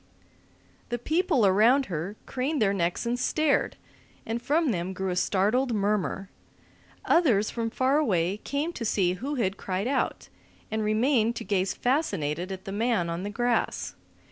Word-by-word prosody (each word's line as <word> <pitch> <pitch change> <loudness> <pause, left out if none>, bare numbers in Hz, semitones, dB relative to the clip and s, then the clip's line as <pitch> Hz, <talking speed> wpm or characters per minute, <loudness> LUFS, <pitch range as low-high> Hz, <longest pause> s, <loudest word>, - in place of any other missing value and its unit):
The 240 - -1
people 310 - +2
around 225 +8 +5
her 180 +2 -4
craned 275 +4 -2
their 200 -2 +3
necks 175 +2 -1
and 240 +1 -1
stared, 300 +3 +1 0.5
and 230 +1 -3
from 295 +3 +2
them 180 -1 -2
grew 190 0 -2
a - - -2
startled 215 +7 +1
murmur. 200 -1 0 0.8
Others 235 - +3
from 230 -1 -2
farther 260 +5 +2
away 190 - +1
came 290 +9 -3
to 245 - -5
see 190 -5 +1
who 270 +11 -4
had 200 -6 -1
cried 190 +3 -2
out, 270 0 -1 0.4
and 220 0 -1
remained 225 +2 +2
to 230 - -5
gaze 195 -3 0
fascinated 190 - -1
at 190 0 -7
the 195 - -5
man 205 -5 0
on 170 +1 -3
the 200 - -4
grass. 240 +3 -1
220 Hz, 160 wpm, -27 LUFS, 190-255 Hz, 0.8 s, around